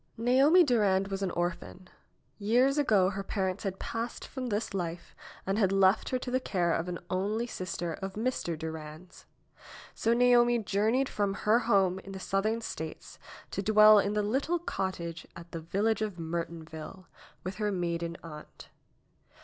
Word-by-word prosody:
Naomi 270 +10 +5
Durand 200 - +2
was 195 0 -3
an 195 - 0
orphan. 175 +1 -4 0.5
Years 250 +7 +3
ago 200 -9 +3
her 195 0 -4
par 195 -1 -1
ents 185 +2 -6
had 195 -2 -3
passed 230 +3 -5
from 260 -2 -5
this 215 -1 -2
life 170 -2 -5 0.3
and 195 +3 0
had 195 -3 +3
left 195 +1 +3
her 255 - 0
to 250 0 -6
the 255 - +2
care 175 -9 0
of 170 +2 -2
an 175 - -3
only 205 +5 0
sister 185 -6 -4
of 190 +3 -6
Mr. 215 -7 -2
Durand's. 160 +2 -8 0.7
So 230 +1 +1
Naomi 240 0 +5
jour 210 -1 0
neyed 260 +3 +2
from 200 -4 -1
her 220 +3 +5
home 190 -3 +3
in 195 0 -10
the 190 - -6
Southern 215 +4 0
States 160 -7 -7 0.3
to 195 - -2
dwell 215 +1 +7
in 200 +1 0
the 210 0 +1
little 275 +11 0
cottage, 175 - -4
at 170 0 -11
the 165 - -5
village 200 +6 0
of 210 -4 -3
Mertonville, 165 +1 -6 0.4
with 185 +1 -5
her 210 -1 0
maiden 170 -2 -2
aunt. 150 -2 -11
195 Hz, 170 wpm, -30 LUFS, 175-225 Hz, 0.7 s, dwell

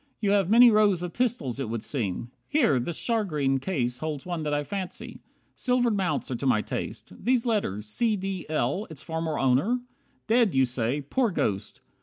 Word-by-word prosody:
You 200 -2 +1
have 200 -3 +3
many 235 +2 +8
rows 205 -5 +3
Of 175 -1 -5
pistols 215 - -1
it 135 -5 -3
would 115 -1 -3
seem. 115 -2 -3 0.2
Here, 245 - +3
this 155 +7 -3
shagreen 155 - 0
Case 125 -7 -2
holds 155 -3 -4
one 175 -2 -3
that 150 -1 -2
I 145 0 0
fancy. 190 +2 -6 0.4
Silvered 245 -3 +1
mounts 170 -9 -1
Are - - -1
to 135 - -2
my 110 -4 +3
taste. - - -5
These 250 -1 +2
letters 195 - -1
`C. 210 - +1
D. 190 -2 -4
L.' 155 - -1
Its 155 -2 -8
former 160 -1 -3
owner? 135 - +2 0.5
Dead, 225 - +3
you 130 0 +5
say. 125 +3 -1
Poor 230 - 0
Ghost! 100 - -2
160 Hz, 185 wpm, -27 LUFS, 130-210 Hz, 0.5 s, many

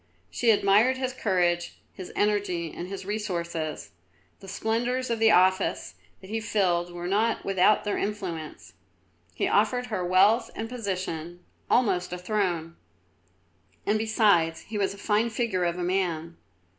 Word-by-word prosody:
She 235 - +1
admired 215 +4 +4
his 255 -1 -2
courage, 175 -7 0 0.2
his 185 - -9
energy, 200 -6 0
and 175 - -6
his 190 0 -7
resource; 195 -5 -3
the 95 - -8
splendours 235 +5 -1
of 230 - -1
the 225 0 +5
office 185 -1 +2 0.3
that 190 +1 -12
he 225 - -1
filled 180 -6 0
were 175 0 -7
not 215 +4 0
without 195 +2 +3
their 205 - -1
influence; 175 - -5 0.6
he - - 0
offered 220 +4 +2
her 185 - -1
wealth 205 +6 +4
and 225 - -4
position, 185 -7 -4 0.3
almost 185 -8 +2
a 180 - -3
throne; 180 -4 -2 1.1
and 215 +1 +1
besides 205 -7 +2
he 220 - -6
was 195 0 0
a - - -15
fine 210 +3 +1
figure 220 -6 -1
of 170 0 -1
a 180 - -3
man. 170 -3 -1
195 Hz, 145 wpm, -26 LUFS, 175-220 Hz, 1.1 s, the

